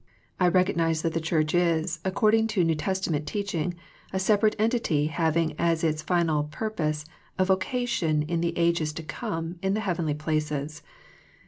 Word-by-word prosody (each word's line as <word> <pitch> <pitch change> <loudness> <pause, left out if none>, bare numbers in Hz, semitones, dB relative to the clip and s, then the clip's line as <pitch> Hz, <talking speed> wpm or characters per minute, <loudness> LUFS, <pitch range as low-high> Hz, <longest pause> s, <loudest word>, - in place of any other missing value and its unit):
I 180 - +4
recognize 170 -3 +2
that 165 -1 0
the 165 - -1
Church 155 -1 0
is, 170 -1 +1
according 215 +3 +3
to 205 -6 +1
l^ew 165 - +3
Testament 155 -2 -1
teaching, 180 -4 -2 0.4
a 190 - -2
separate 210 +2 +3
entity 215 -10 +1
having 160 +1 +1
as 170 -1 +1
its 155 -1 +1
final 160 -3 +1
purpose 155 -3 -3 0.3
a 185 - +3
vocation 190 -5 0
in 165 +2 -1
the 170 0 -1
ages 170 -3 +1
to 165 - -6
come 165 +2 -4
in 195 +1 +1
the 215 - -1
heavenly 170 -7 -1
places. 150 -1 -2
170 Hz, 155 wpm, -26 LUFS, 155-190 Hz, 0.4 s, I